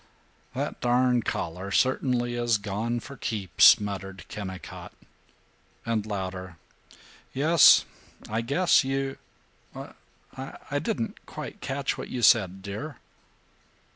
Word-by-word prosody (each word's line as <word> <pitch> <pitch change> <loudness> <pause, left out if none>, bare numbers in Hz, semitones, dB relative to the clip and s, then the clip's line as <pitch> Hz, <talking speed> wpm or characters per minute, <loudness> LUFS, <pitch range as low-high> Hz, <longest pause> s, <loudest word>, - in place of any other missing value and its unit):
"That - - -3
darn 125 0 +3
collar 90 -1 -4
certainly 125 +1 +1
is 120 -2 +1
gone 105 +4 -3
for 140 +1 -10
keeps," 110 -2 +5
muttered 95 -3 -6
Kennicott 95 -3 -8 0.9
and, 110 -2 -1
louder, 95 -3 -5 0.8
"Yes, 155 +4 +6 0.4
I 110 +2 -1
guess 145 +10 +3
you 135 0 -2 0.6
I - - -8
didn't - - -3
quite - - -8
catch 135 0 -2
what - - -6
you 125 -2 -4
said, 95 -6 +4
dear." 105 +10 -6
115 Hz, 105 wpm, -27 LUFS, 100-130 Hz, 0.9 s, Yes